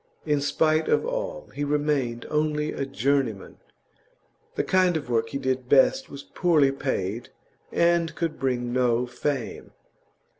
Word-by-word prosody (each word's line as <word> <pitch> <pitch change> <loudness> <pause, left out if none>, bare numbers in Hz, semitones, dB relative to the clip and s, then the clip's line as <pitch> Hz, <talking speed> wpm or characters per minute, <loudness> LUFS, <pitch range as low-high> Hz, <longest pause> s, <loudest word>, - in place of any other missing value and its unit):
In 150 -2 +1
spite 155 +2 +2
of - - +2
all, - - -4
he 145 - -3
remained 145 -5 0
only 150 0 0
a 140 - -3
journeyman. 135 -6 -1 1.0
The - - 0
kind 185 -2 +3
of 140 -5 -6
work 115 -1 +1
he 140 - -3
did 130 -2 -2
best 265 - +4
was 140 0 -9
poorly 155 -6 +2
paid, 120 -5 -3 0.4
and 170 -1 +2
could 165 -2 -3
bring 125 -2 -1
no 125 -1 +2
fame. 125 +1 -4
140 Hz, 140 wpm, -25 LUFS, 125-160 Hz, 1.0 s, best